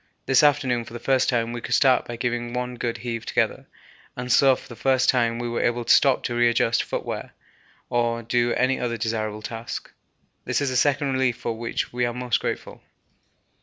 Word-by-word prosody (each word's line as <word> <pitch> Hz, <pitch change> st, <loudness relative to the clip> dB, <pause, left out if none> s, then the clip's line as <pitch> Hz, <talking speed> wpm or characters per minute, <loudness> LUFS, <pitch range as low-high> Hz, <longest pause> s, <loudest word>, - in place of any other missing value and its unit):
This 135 Hz, -, +4 dB
afternoon 135 Hz, -5 st, +2 dB
for 115 Hz, 0 st, -12 dB
the 120 Hz, -, -6 dB
first 130 Hz, 0 st, +2 dB
time 120 Hz, -2 st, 0 dB
we 120 Hz, -, -5 dB
could -, -, 0 dB
start 130 Hz, -3 st, +4 dB
by 120 Hz, -, -5 dB
giving 120 Hz, 0 st, -2 dB
one 125 Hz, 0 st, -3 dB
good 120 Hz, -1 st, -3 dB
heave 115 Hz, 0 st, -4 dB
together, -, -, -1 dB, 0.5 s
and 125 Hz, 0 st, -3 dB
so 135 Hz, +1 st, +6 dB
for -, -, -13 dB
the 120 Hz, -, -10 dB
first 130 Hz, +1 st, +2 dB
time 115 Hz, -2 st, +2 dB
we 120 Hz, 0 st, -3 dB
are 120 Hz, 0 st, -2 dB
able 120 Hz, 0 st, 0 dB
to -, -, +5 dB
stop 135 Hz, -3 st, +4 dB
to 120 Hz, -, -2 dB
readjust 120 Hz, -1 st, +2 dB
footgear -, -, -5 dB, 0.5 s
or 115 Hz, -1 st, 0 dB
do 120 Hz, +1 st, +1 dB
any 130 Hz, +1 st, +1 dB
other 120 Hz, -1 st, -2 dB
desirable 110 Hz, -1 st, -3 dB
task. 115 Hz, +1 st, -6 dB, 0.5 s
This -, -, 0 dB
is 140 Hz, -2 st, -1 dB
a -, -, -3 dB
second 140 Hz, +1 st, +2 dB
relief 130 Hz, -2 st, +1 dB
for 115 Hz, -, -3 dB
which 115 Hz, +1 st, -3 dB
we 125 Hz, 0 st, -1 dB
are 120 Hz, -, -4 dB
most 125 Hz, -2 st, 0 dB
grateful. -, -, -5 dB
120 Hz, 205 wpm, -24 LUFS, 115-130 Hz, 0.5 s, so